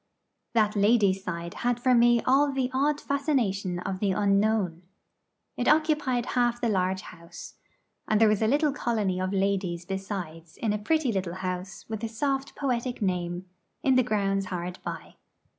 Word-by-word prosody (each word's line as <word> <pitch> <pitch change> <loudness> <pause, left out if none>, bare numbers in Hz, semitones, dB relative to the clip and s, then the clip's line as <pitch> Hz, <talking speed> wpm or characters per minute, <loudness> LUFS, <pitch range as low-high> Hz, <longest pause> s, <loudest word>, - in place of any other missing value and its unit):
That 215 -2 +3
ladies' 200 -2 +3
side 170 0 -5
had 245 0 +1
for 255 +1 +3
me 240 -1 +5
all 280 +2 +4
the 265 -2 -1
odd 290 +3 +1
fascination 235 - 0
of 185 +1 -4
the 195 -2 +1
unknown. 200 -3 +1 0.7
It 245 - -2
occupied 300 -6 +2
half 240 -1 +2
the 235 - 0
large 190 -2 0
house; 170 0 -11 0.5
and 215 - +2
there 225 - +6
was 210 0 +2
a 220 - +3
little 290 +4 +2
colony 215 -8 -1
of 185 0 -1
ladies 190 -3 -1
besides 180 -4 -6
in 220 -3 0
a 210 - -2
pretty 300 +3 +1
little 185 -4 -2
house 185 0 -5
with 220 0 -5
a - - 0
soft 270 +4 -2
poetic 250 -2 -2
name, 180 -2 -2 0.4
in 265 - +4
the 255 - +5
grounds 195 -4 0
hard 180 0 -5
by. - - -7
210 Hz, 165 wpm, -27 LUFS, 185-245 Hz, 0.7 s, there